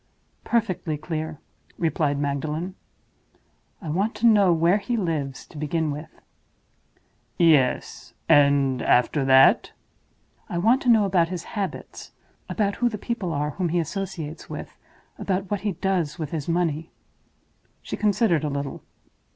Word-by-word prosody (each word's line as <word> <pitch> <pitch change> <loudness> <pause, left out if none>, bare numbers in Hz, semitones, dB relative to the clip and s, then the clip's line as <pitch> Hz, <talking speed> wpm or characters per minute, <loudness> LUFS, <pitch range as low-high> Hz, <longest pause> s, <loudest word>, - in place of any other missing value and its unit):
"Perfectly 185 -9 -1
clear," 155 0 -4 0.4
replied 155 -4 0
Magdalen. 150 +5 -2 1.1
"I 160 - -5
want 195 +8 0
to - - -1
know 205 -5 +6
where 170 +4 +3
he 230 +4 -2
lives, 150 - -2
to 150 - -11
begin 155 +1 -1
with." 150 +2 -6 1.3
"Yes. 150 -7 +2
And 140 -2 +4
after 130 +4 +2
that?" 130 0 +5 0.8
"I 175 - -3
want 230 +9 +3
to 250 - 0
know 220 -3 +5
about 180 -4 +2
his 180 -2 -4
habits; 200 -1 -6 0.4
about 205 -2 0
who 245 - +2
the 215 - -5
people 210 -4 -3
are 150 0 -1
whom 175 +2 -2
he 175 - 0
associates 170 -2 -4
with; - - -7 0.4
about 190 0 -2
what 205 - -1
he 205 -2 -1
does 180 -4 -1
with 155 -4 -5
his 155 -4 -4
money—" 165 -2 0 0.9
She - - -4
considered 205 -6 +2
a 150 - 0
little. 140 -1 -4
165 Hz, 140 wpm, -24 LUFS, 150-195 Hz, 1.3 s, know